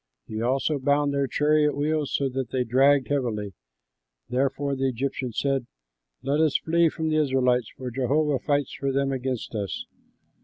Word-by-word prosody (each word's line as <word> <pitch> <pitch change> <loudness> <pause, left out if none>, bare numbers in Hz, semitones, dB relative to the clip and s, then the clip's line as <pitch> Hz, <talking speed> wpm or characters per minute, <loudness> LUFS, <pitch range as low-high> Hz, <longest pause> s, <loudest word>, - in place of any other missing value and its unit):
He 110 0 -5
also 135 +4 0
bound 145 +1 +2
their 140 -1 +1
chariot 150 +1 +2
wheels, 150 0 0
so 140 - +1
that 130 0 -3
they 130 -1 0
dragged 135 +3 +3
heavily. 110 -8 -1 0.8
Therefore 135 +2 0
the 135 0 0
Egyptians 130 -1 -3
said, 135 -3 0 0.6
"Let 140 +3 +1
us 155 -3 +3
flee 170 0 +2
from 160 +1 -3
the 155 - +1
Israelites, 130 -4 +2
for 130 -1 -5
Jehovah 135 +3 +1
fights 145 -2 0
for 140 0 -2
them 135 0 0
against 130 -3 -3
us." 100 -5 -3
135 Hz, 160 wpm, -25 LUFS, 125-145 Hz, 0.8 s, dragged